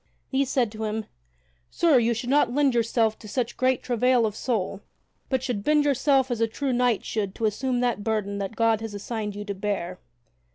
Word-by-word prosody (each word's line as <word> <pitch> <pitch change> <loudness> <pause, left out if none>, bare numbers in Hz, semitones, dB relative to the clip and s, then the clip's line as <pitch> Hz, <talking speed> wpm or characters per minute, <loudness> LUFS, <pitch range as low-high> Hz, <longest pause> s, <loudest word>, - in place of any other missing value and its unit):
These 270 -1 +1
said 245 -6 +1
to 220 0 -4
him: 215 0 -2 0.6
"Sir, 325 -6 +4
you 235 0 +1
should 240 +3 -3
not 285 -4 +4
lend 280 0 +2
yourself 225 -1 +1
to 215 - -11
such 240 +2 -2
great 255 0 +1
travail 250 0 +2
of 215 -1 -2
soul, 205 -5 -2 0.5
but 260 -2 0
should 240 -6 -2
bend 300 +2 +3
yourself 270 -1 +2
as 235 -2 -1
a 230 - +3
true 265 +4 -2
knight 245 -2 +1
should 200 -3 -2
to 225 - -1
assume 245 +4 0
that 240 -4 0
burden 205 -2 -1
that 200 +2 -4
God 225 -1 +2
hath 225 -2 -5
assigned 210 0 -4
you 205 0 -6
to 205 - -3
bear." 190 -2 -3
230 Hz, 205 wpm, -25 LUFS, 210-255 Hz, 0.6 s, Sir